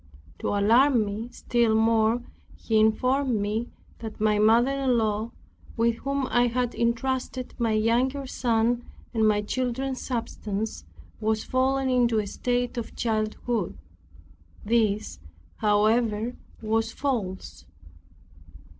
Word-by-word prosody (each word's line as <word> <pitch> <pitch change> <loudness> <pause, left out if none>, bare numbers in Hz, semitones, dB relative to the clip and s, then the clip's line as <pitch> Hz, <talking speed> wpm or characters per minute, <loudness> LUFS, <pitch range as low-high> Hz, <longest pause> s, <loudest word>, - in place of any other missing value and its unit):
To - - -3
alarm 230 +4 +4
me 210 +4 -5
still 235 -3 +1
more, 225 +1 +3 0.3
he 220 -1 0
informed 250 +3 +2
me 215 +4 -2 0.3
that 220 -2 -7
my 210 -1 +2
mother 230 +5 +4
in 270 -3 +1
law, 220 0 0 0.5
with 230 0 +2
whom 275 +1 -2
I 245 0 +4
had 245 0 -1
entrusted 255 +2 -1
my 230 -2 +1
younger 245 +6 +1
son 240 -1 0 0.3
and 220 -2 +3
my 210 -1 +2
children's 255 +3 -2
substance, 220 - -4 0.3
was 220 0 0
fallen 265 +1 +1
into 240 -3 +3
a 210 - +1
state 245 +4 -2
of 230 - -7
childhood. 215 -2 -2 0.9
This, 215 - +1 0.4
however, 215 +2 +2 0.3
was 225 +1 0
false. 220 -10 -4
230 Hz, 115 wpm, -26 LUFS, 215-245 Hz, 0.9 s, alarm